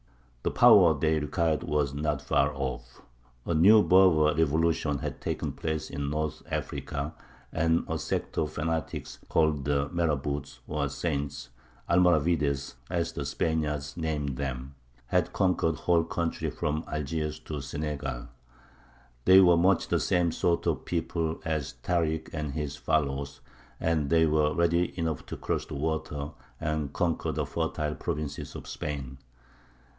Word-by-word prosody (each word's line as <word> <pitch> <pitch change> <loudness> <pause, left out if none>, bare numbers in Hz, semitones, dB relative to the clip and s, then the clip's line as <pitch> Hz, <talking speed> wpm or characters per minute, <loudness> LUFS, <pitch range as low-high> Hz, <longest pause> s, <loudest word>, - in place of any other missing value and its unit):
The - - 0
power 85 -6 +7
they 80 +2 +2
required 80 +1 0
was 75 -2 0
not 75 0 -1
far 70 +2 +2
off. 65 -3 -5 0.4
A 85 - 0
new 100 +7 +7
Berber 85 -5 +5
revolution 80 -1 +1
had 75 -2 -5
taken - - -2
place 80 -1 -3
in 70 0 -3
North 75 0 -2
Africa, 70 +2 -3 0.4
and 80 +1 +2
a - - -2
sect - - -3
of 75 -1 0
fanatics, 80 -1 -3
called 75 -4 +2
the 70 0 +1
marabouts 75 -6 -1
or 75 -2 -1
saints 70 -5 -3 0.4
(Almoravides, 80 -5 +2 0.2
as 85 -1 -1
the - - -4
Spaniards 75 -4 -1
named 75 -5 -2
them), 65 -1 -4 0.3
had - - +1
conquered 90 -4 +2
the 75 - -11
whole 85 -1 +3
country 85 0 -2
from 75 +1 -2
Algiers 75 0 -2
to 75 -2 -5
Senegal. 70 -3 -4 1.0
They 95 +1 +8
were 90 -3 +6
much 90 +2 +3
the - - +2
same 90 -2 +2
sort 85 +1 0
of - - -1
people 80 -1 -2
as 75 -5 -2
Tārik 80 -3 0
and 75 -3 -3
his 75 -2 -3
followers, 70 -2 -1 0.4
and 80 -4 0
they 80 0 +5
were 75 -1 +2
ready 85 +1 +1
enough 80 -4 -2
to - - -6
cross - - -2
the - - -6
water 75 -1 -2 0.3
and 75 -2 -2
conquer 85 +1 0
the - - -2
fertile 75 0 -2
provinces 75 -2 -4
of - - -8
Spain. 70 -3 -5
75 Hz, 145 wpm, -28 LUFS, 70-80 Hz, 1.0 s, They